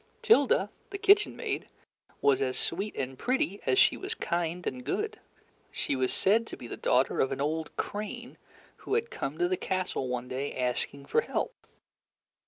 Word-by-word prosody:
Tilda, 270 - +4 0.2
the 395 - -4
kitchen 415 +1 +5
maid, - - -3 0.5
was 140 -2 +4
as 130 -1 0
sweet 195 +5 -1
and 130 -1 -4
pretty 240 -6 0
as - - +3
she - - +5
was 390 +4 -3
kind 170 - -2
and 125 -1 -3
good. - - -2 0.5
She - - -1
was 130 -1 +1
said 225 +4 +3
to - - -7
be - - -9
the - - -5
daughter 130 +2 +2
of 135 - +2
an - - -3
old 155 +2 -2
crane 215 +4 -5 0.4
who 415 - -2
had 460 +1 0
come 140 +3 -4
to 175 +1 +2
the 185 0 0
castle 185 -8 -2
one 125 0 -3
day, 130 +3 -3
asking 130 +2 -2
for 460 - +2
help. 475 - -2
175 Hz, 180 wpm, -29 LUFS, -, 0.5 s, kitchen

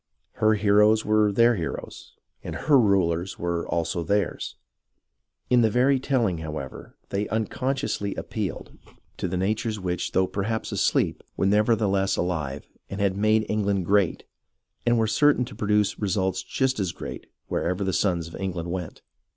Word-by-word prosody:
Her 110 0 +4
heroes 105 +1 +4
were 105 -1 +3
their 115 +4 +4
heroes, 85 - -6 0.3
and - - -5
her 145 -3 +4
rulers 95 -5 +1
were 85 -1 -2
also 85 +1 -1
theirs. 100 +5 -1 0.9
In 125 0 +4
the 110 - +4
very 130 +4 +3
tell 130 -2 +1
ing, 90 -5 -1
however, 75 -4 -7
they 100 +1 -1
unconsciously 115 -1 -2
appealed 105 -6 -4 0.5
to - - -2
the 90 +1 -2
natures 105 +3 -1
which, 90 -2 -3
though 95 - +3
perhaps 105 +4 -3
asleep, - - +1 0.2
were - - +1
nevertheless 105 -1 +2
alive, 75 -6 -2 0.2
and 100 - -5
had 100 -1 +1
made 110 +2 +2
England 100 -3 0
great, 100 -1 +2 0.6
and 120 0 +4
were 110 - +3
certain 125 +4 +3
to 110 - -11
produce 105 -1 +1
results 95 -2 0
just 130 +6 -1
as 95 -4 -1
great - - -8 0.2
wherever 90 +3 -1
the 95 -1 -1
sons 85 -2 0
of 85 - -10
England 90 -3 -4
went. 90 -3 -5
100 Hz, 155 wpm, -25 LUFS, 90-110 Hz, 0.9 s, Her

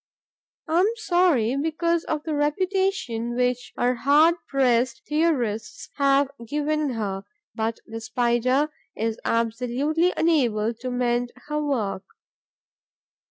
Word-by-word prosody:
I 325 +2 +2
am 380 - +4
sorry, 345 - +2
because 325 +3 0
of 305 -1 -2
the 315 - -3
reputation 295 - 0
which 250 0 0
our 245 +1 +2
hard 290 +6 +4
pressed 250 -3 +1
theorists 290 -9 -1
have 275 0 +3
given 295 +2 -1
her, 195 -4 -3 0.3
but 225 0 -2
the 225 0 -7
Spider 245 +4 +1 0.3
is 225 +1 -2
absolutely 250 +9 0
unable 240 -9 +2
to 240 +3 -6
mend 245 -1 0
her 300 0 -2
work. 220 -9 -1
255 Hz, 115 wpm, -24 LUFS, 235-305 Hz, 0.3 s, am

